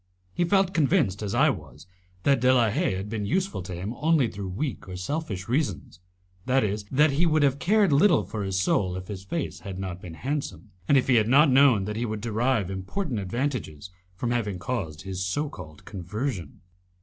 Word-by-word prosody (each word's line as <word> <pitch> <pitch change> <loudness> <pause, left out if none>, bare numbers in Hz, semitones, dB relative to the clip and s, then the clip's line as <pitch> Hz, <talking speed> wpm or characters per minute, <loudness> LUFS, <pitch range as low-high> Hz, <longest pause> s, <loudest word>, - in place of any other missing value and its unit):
He 175 - +1
felt 195 0 +2
convinced, 125 - +2
as 105 -2 -3
I - - +5
was, - - -10 0.4
that 140 -2 +3
De 130 +1 +5
la 120 -4 +4
Haye 95 - 0
had 95 +2 -4
been 105 -2 -3
useful 190 - -1
to 90 0 -6
him 95 +6 -4
only 155 -4 +3
through 100 -3 -6
weak 110 0 -4
or 90 - -6
selfish 95 - -4
reasons, 115 - -2 0.5
that 130 0 +3
is, 105 0 -2
that 150 +3 +4
he 160 +5 +2
would 155 -2 +3
have 140 0 +2
cared 200 -2 +3
little 140 - +5
for 100 +3 -5
his 95 -1 -1
soul 95 -1 +1
if 90 0 -8
his 95 -2 -6
face 145 - -4
had 95 -3 -7
not 95 -2 -5
been 85 -2 -9
handsome, 135 - -4 0.2
and 140 - +5
if 130 - +2
he 125 -2 +5
had 110 -1 +3
not 140 +4 +5
known 130 -7 +5
that 105 +1 -4
he 120 +1 -1
would 110 0 -3
derive 115 -2 0
important 115 - -3
advantages 100 - -3 0.2
from 120 +5 -2
having 105 -6 -1
caused 90 -8 -4
his 95 -1 -4
so 140 +12 -1
called 80 - -11
conversion. 100 - -5
110 Hz, 205 wpm, -26 LUFS, 95-140 Hz, 0.5 s, I